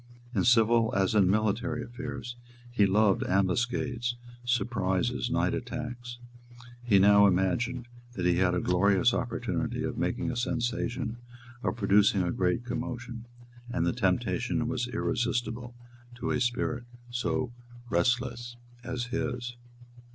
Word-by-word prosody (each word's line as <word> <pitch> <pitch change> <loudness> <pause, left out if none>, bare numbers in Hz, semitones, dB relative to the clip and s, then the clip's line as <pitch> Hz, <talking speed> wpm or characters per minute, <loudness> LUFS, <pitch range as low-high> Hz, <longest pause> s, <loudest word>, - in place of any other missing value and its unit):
In 95 -6 +1
civil 115 -1 +4
as 95 0 +2
in 100 -4 +4
military 110 +4 0
affairs, 120 0 -6 0.4
he 105 -4 +4
loved 105 0 +3
ambuscades, 120 +5 0 0.3
surprises, 105 -6 0
night - - +1
attacks. 120 0 -5 0.7
He 115 -5 +4
now 100 +1 +7
imagined 105 +7 0 0.3
that 90 -6 -3
he 90 -1 +3
had 90 -1 +3
a - - +1
glorious 95 +2 +3
opportunity - - -2
of - - -3
making 125 - -1
a - - -5
sensation, 120 0 -2 0.4
of 120 - -1
producing 100 -2 +4
a 90 - 0
great 90 +6 0
commotion; 120 -1 -5 0.4
and 125 +1 0
the - - +1
temptation 120 +2 0
was 125 -1 -1
irresistible 120 0 -2 0.4
to 120 +2 -3
a 125 - 0
spirit 120 0 -1 0.3
so 120 0 -1 0.4
restless 120 +5 0 0.3
as 125 0 -3
his. 120 -1 -2
120 Hz, 125 wpm, -29 LUFS, 100-120 Hz, 0.7 s, now